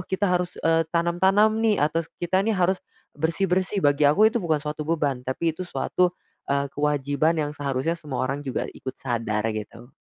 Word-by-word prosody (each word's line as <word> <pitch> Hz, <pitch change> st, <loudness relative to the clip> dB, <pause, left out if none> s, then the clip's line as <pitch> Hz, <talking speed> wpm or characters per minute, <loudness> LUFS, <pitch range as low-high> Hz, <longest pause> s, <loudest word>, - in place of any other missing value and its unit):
kita 190 Hz, +2 st, -2 dB
harus, 180 Hz, 0 st, -1 dB
eee, 165 Hz, 0 st, +3 dB
tanam-tanam, 190 Hz, +6 st, +3 dB
nih, 220 Hz, -2 st, +3 dB
atau 155 Hz, +3 st, +1 dB, 0.2 s
kita, 185 Hz, +2 st, +1 dB
nih, 215 Hz, 0 st, 0 dB
harus 185 Hz, +1 st, +2 dB, 0.3 s
bersih-bersih." 180 Hz, +4 st, 0 dB
Bagi 145 Hz, 0 st, +4 dB
aku 215 Hz, +9 st, +5 dB
itu 235 Hz, -, 0 dB
bukan 160 Hz, -4 st, +1 dB
suatu 150 Hz, 0 st, -4 dB
beban. 145 Hz, -6 st, 0 dB
Tapi 160 Hz, +5 st, 0 dB
itu 170 Hz, -, -13 dB
suatu, 180 Hz, +1 st, 0 dB, 0.3 s
eee, 140 Hz, 0 st, 0 dB
kewajiban 145 Hz, +2 st, +1 dB
yang 150 Hz, -2 st, -1 dB
seharusnya 140 Hz, +2 st, -1 dB
semua 145 Hz, -5 st, -4 dB
orang 140 Hz, +2 st, -2 dB
juga 130 Hz, -, -2 dB
ikut 130 Hz, -, -7 dB
sadar, 115 Hz, -4 st, -2 dB
gitu. 115 Hz, +4 st, -8 dB
160 Hz, 175 wpm, -25 LUFS, 140-180 Hz, 0.3 s, aku